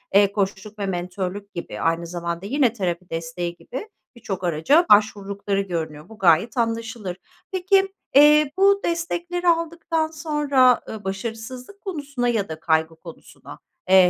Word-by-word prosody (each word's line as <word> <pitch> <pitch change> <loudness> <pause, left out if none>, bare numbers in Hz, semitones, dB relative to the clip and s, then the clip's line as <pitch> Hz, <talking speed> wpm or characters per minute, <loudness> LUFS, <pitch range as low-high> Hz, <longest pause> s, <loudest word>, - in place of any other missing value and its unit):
eee, 200 -1 +6
koçluk 205 +1 -3
ve 200 - -1
mentörlük 185 +2 -4
gibi 170 - -6
aynı 165 +1 0
zamanda 170 +1 -4
yine 255 0 +2
terapi 180 -4 -3
desteği 165 +1 -4
gibi 410 - -8 0.3
birçok 195 -5 -5
araca 175 - +3
başvurdukları 200 -1 +2
görünüyor. 160 -3 -5
Bu 220 - -12
gayet 185 - +3
anlaşılır. 225 -5 -2 0.3
Peki, 385 +1 +2 0.2
eee, 300 0 +7
bu 395 +1 +5
destekleri 345 +1 -2
aldıktan 330 -1 +1
sonra, 295 -5 +2
ııı, 215 -2 -7
başarısızlık 225 - -6
konusuna 285 -9 -3
ya 205 -6 0
da 160 0 -6
kaygı 160 0 +1
konusuna, 165 0 -13 0.3
eee, 190 - +6
210 Hz, 135 wpm, -23 LUFS, 180-295 Hz, 0.3 s, eee